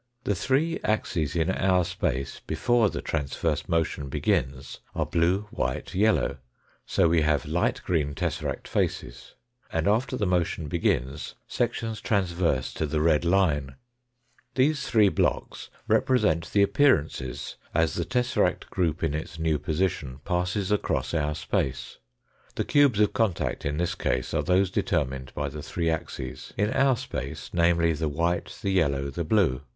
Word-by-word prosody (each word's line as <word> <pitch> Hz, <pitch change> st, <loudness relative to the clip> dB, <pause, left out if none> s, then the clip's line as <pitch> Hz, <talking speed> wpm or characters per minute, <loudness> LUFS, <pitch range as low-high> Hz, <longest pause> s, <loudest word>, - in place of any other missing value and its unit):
The 105 Hz, -, +1 dB
three 135 Hz, -, +1 dB
axes 85 Hz, -8 st, -1 dB
in 85 Hz, +2 st, +2 dB
our 95 Hz, -2 st, +2 dB
space 70 Hz, -6 st, -2 dB
before 115 Hz, +7 st, +2 dB
the -, -, -5 dB
transverse 70 Hz, -4 st, -2 dB
motion 80 Hz, -4 st, 0 dB
begins 65 Hz, +1 st, -1 dB, 0.2 s
are -, -, 0 dB
blue, 85 Hz, +4 st, +2 dB
white, -, -, -3 dB
yellow, 100 Hz, -7 st, +2 dB, 0.5 s
so -, -, +3 dB
we 80 Hz, 0 st, +3 dB
have 75 Hz, -1 st, +1 dB
light -, -, 0 dB
green 75 Hz, -5 st, 0 dB
tesseract -, -, -3 dB
faces, -, -, -3 dB, 0.4 s
and 80 Hz, +2 st, 0 dB
after 125 Hz, +5 st, +1 dB
the 105 Hz, -, 0 dB
motion 85 Hz, -3 st, 0 dB
begins 70 Hz, -4 st, -1 dB
sections 110 Hz, -2 st, -2 dB
transverse 85 Hz, -, 0 dB
to 80 Hz, -, -2 dB
the 75 Hz, +1 st, -1 dB
red 80 Hz, 0 st, +3 dB
light. 85 Hz, -6 st, +2 dB, 0.9 s
These 140 Hz, +2 st, +2 dB
three 105 Hz, -3 st, +5 dB
blocks -, -, -1 dB, 0.2 s
represent 105 Hz, -11 st, +2 dB
the 100 Hz, -, +4 dB
appearances 80 Hz, -, +1 dB
as 80 Hz, -1 st, +2 dB
the -, -, -1 dB
tesseract 125 Hz, -1 st, 0 dB
group 85 Hz, -3 st, 0 dB
in 80 Hz, -3 st, +1 dB
its 80 Hz, +1 st, -5 dB
new 80 Hz, -2 st, +1 dB
position 75 Hz, -4 st, -2 dB
passes 90 Hz, +2 st, -1 dB
across 105 Hz, -4 st, 0 dB
our 75 Hz, -2 st, 0 dB
space. 65 Hz, -3 st, -2 dB, 0.6 s
The -, -, -1 dB
cubes 140 Hz, -7 st, +4 dB
of 105 Hz, -, +3 dB
contact 110 Hz, -9 st, 0 dB
in 75 Hz, +1 st, -2 dB
this 90 Hz, +2 st, 0 dB
case -, -, -1 dB
are -, -, +2 dB
those 95 Hz, +1 st, +2 dB
determinal 65 Hz, -10 st, -1 dB
by 75 Hz, -, -1 dB
the 75 Hz, +2 st, -7 dB
three 85 Hz, +2 st, -2 dB
axes^in 95 Hz, +5 st, -3 dB
our 135 Hz, -2 st, +4 dB
space, 120 Hz, -, -6 dB
namely, 85 Hz, -1 st, +3 dB
the 80 Hz, 0 st, -1 dB
white, 85 Hz, +4 st, -1 dB
the 100 Hz, -, +1 dB
yellow, 70 Hz, -7 st, +1 dB
the 85 Hz, +5 st, -3 dB
blue. 80 Hz, -7 st, +2 dB
85 Hz, 150 wpm, -26 LUFS, 75-100 Hz, 0.9 s, three